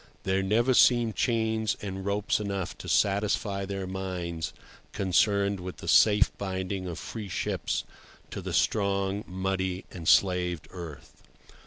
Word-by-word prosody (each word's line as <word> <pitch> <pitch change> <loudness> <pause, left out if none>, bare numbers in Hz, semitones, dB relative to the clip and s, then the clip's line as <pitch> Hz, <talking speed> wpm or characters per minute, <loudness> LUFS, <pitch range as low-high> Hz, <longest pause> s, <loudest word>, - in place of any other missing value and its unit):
There 95 0 +1
never 115 +7 +2
seem 120 -2 +5
chains 110 -2 0
and 95 -1 -5
ropes 100 +2 0
enough 100 -3 -3
to - - -7
satisfy 100 0 +1
their 95 -1 -4
minds 90 -4 -4 0.4
concerned 100 +1 +2
with 90 0 -7
the - - -9
safe 105 0 +5
binding 95 -1 -3
of 85 -1 -5
free 105 +4 -6
ships 85 - -2 0.5
to - - -5
the - - -5
strong, 100 -1 +1
muddy, 95 0 -2
enslaved 90 0 +2
earth. 85 -6 -10
95 Hz, 130 wpm, -28 LUFS, 95-105 Hz, 0.5 s, seem